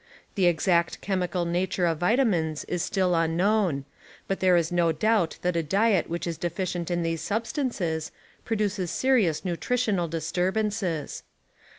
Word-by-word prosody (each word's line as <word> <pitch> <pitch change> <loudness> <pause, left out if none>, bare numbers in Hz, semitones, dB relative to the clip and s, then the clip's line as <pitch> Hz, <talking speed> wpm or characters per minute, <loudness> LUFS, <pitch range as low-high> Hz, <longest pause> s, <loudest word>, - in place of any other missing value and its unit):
* - - -34
The 190 -4 +2
exact 170 0 +2
chemical 180 -2 -1
nature 175 +1 0
of 165 -2 0
vitamines 175 - +1
is 180 - -2
still 185 -1 +1
un 165 -1 +1
known, 185 -8 +1 0.4
but 195 - -2
there 185 -2 +4
is 170 0 0
no 170 -1 +2
doubt 205 +2 +1
that 180 -1 0
a 165 - +2
diet 195 +4 +2
which 170 +1 -3
is 165 -2 -4
deficient 175 0 -3
in 175 -1 0
these 165 -1 -2
substances 205 - -2 0.3
produces 205 -5 -1
serious 210 - +1
nutritional 195 0 0
disturbances. 180 +1 -2
180 Hz, 150 wpm, -26 LUFS, 165-200 Hz, 0.4 s, there